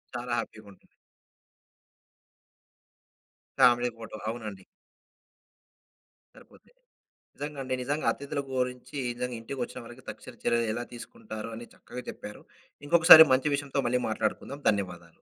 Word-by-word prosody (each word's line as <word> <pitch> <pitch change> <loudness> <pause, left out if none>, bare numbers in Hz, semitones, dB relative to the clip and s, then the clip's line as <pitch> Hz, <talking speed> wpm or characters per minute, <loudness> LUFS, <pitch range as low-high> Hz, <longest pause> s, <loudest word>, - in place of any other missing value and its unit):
చాలా 120 0 -3
హ్యాపీగుంటుంది. 100 -3 -9 2.7
Family 120 0 +5
photo, 115 -1 -9
అవునండి. 105 -5 -6 1.7
సరిపొద్ది, - - -19 0.6
నిజంగండి, 140 -3 -4
నిజంగా 145 +4 -2
అతిధుల 140 0 -4
గోరించి, 125 +2 -3 0.2
నిజంగా 125 -1 -3
ఇంటికొచ్చిన 125 +1 -5
వారికి - - -13
తక్షణ - - -11
చర్యలు 115 -1 +2
ఎలా 120 0 -3
తీసుకుంటారు 120 - -8
అని 120 0 -9
చక్కగా 125 - -9
చెప్పారు. 105 - -10 0.4
ఇంకొకసారి 160 0 +10
మంచి 140 +2 +1
విషయంతో 140 -1 -1
మళ్ళీ 125 +1 +1
మాట్లాడుకుందాం. 110 +6 -3
ధన్యవాదాలు. 90 -4 -4
125 Hz, 105 wpm, -28 LUFS, 115-140 Hz, 2.7 s, ఇంకొకసారి